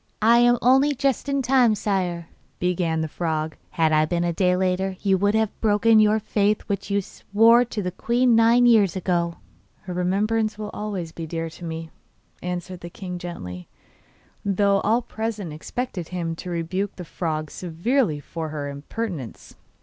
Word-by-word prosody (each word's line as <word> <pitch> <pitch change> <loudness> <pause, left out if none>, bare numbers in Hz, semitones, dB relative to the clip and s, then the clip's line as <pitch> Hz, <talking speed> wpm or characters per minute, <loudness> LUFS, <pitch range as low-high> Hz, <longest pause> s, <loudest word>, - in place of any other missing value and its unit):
'I 230 +2 +6
am 240 0 +5
only 270 +4 +4
just 275 0 0
in 275 -1 0
time, 245 -3 +4
sire,' 180 -5 -2 0.3
began 175 -3 0
the 160 - -1
frog; 155 -1 -2
'had 160 -3 +1
I 155 0 +4
been 170 +2 -1
a 170 -1 0
day 180 +1 +2
later 190 0 0
you 195 -2 +3
would 205 +2 +2
have 220 -1 -1
broken 220 +1 +4
your 215 0 +4
faith 210 -1 +1
which 200 -1 -4
you 200 0 +1
swore 230 +6 +4
to 220 -3 -4
the 180 - -2
queen 240 +5 +2
nine 230 +2 +5
years 210 -7 +5
ago.' 175 -2 0 0.5
'Her 185 - -7
remembrance 210 +5 0
will 210 -1 -5
always 195 -6 -4
be 165 0 -7
dear 165 0 -4
to 170 - -10
me,' 160 0 -6 0.5
answered 180 0 -5
the 175 - -8
king 180 0 -7
gently, 90 - -7 0.8
though 200 0 +2
all 230 +4 +2
present 220 -8 -4
expected 180 +2 -5
him 170 -2 -3
to 180 - -7
rebuke 180 +4 -2
the 180 - -8
frog 155 -2 -3
severely 180 - 0
for 160 +2 -6
her 145 -2 -4
impertinence. 145 - -6
185 Hz, 170 wpm, -24 LUFS, 170-220 Hz, 0.8 s, I